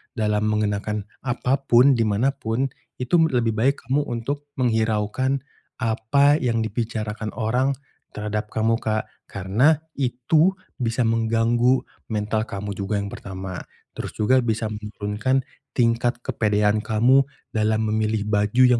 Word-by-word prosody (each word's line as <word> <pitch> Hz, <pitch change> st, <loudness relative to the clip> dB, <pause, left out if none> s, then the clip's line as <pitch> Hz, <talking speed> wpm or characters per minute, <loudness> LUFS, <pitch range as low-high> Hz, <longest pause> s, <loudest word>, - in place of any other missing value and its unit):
dalam 105 Hz, -1 st, +1 dB
mengenakan 105 Hz, 0 st, -1 dB, 0.2 s
apa 125 Hz, +1 st, 0 dB
pun 125 Hz, +4 st, +6 dB
di 115 Hz, -2 st, +1 dB
manapun 125 Hz, +3 st, 0 dB, 0.3 s
itu 125 Hz, +6 st, 0 dB
lebih 120 Hz, -6 st, +1 dB
baik 130 Hz, +6 st, +2 dB
kamu 140 Hz, +3 st, +2 dB
untuk 140 Hz, +5 st, -4 dB
menghiraukan 115 Hz, +2 st, 0 dB, 0.4 s
apa 140 Hz, +7 st, +3 dB
yang 115 Hz, -3 st, 0 dB
dibicarakan 110 Hz, -1 st, -3 dB
orang 125 Hz, +5 st, +1 dB, 0.4 s
terhadap 105 Hz, 0 st, -3 dB
kamu, 115 Hz, +1 st, +1 dB
Kak, 110 Hz, 0 st, -1 dB, 0.2 s
karena 105 Hz, -, +2 dB, 0.2 s
itu 140 Hz, +8 st, +2 dB, 0.2 s
bisa 120 Hz, 0 st, 0 dB
mengganggu 115 Hz, +2 st, +2 dB, 0.2 s
mental 110 Hz, +1 st, -1 dB
kamu 100 Hz, +1 st, -5 dB
juga 100 Hz, +1 st, -3 dB
yang 100 Hz, 0 st, -2 dB
pertama. 95 Hz, -1 st, -6 dB, 0.4 s
Terus -, -, -5 dB
juga 130 Hz, +5 st, +3 dB
bisa 110 Hz, -1 st, -1 dB
menurunkan 105 Hz, +4 st, -2 dB, 0.3 s
tingkat 120 Hz, 0 st, +2 dB
kepedean 105 Hz, -1 st, +1 dB
kamu 120 Hz, +5 st, +4 dB, 0.3 s
dalam 110 Hz, 0 st, +1 dB
memilih 110 Hz, -1 st, 0 dB
baju 105 Hz, +4 st, +3 dB
yang 125 Hz, -1 st, +4 dB
115 Hz, 125 wpm, -23 LUFS, 105-125 Hz, 0.4 s, pun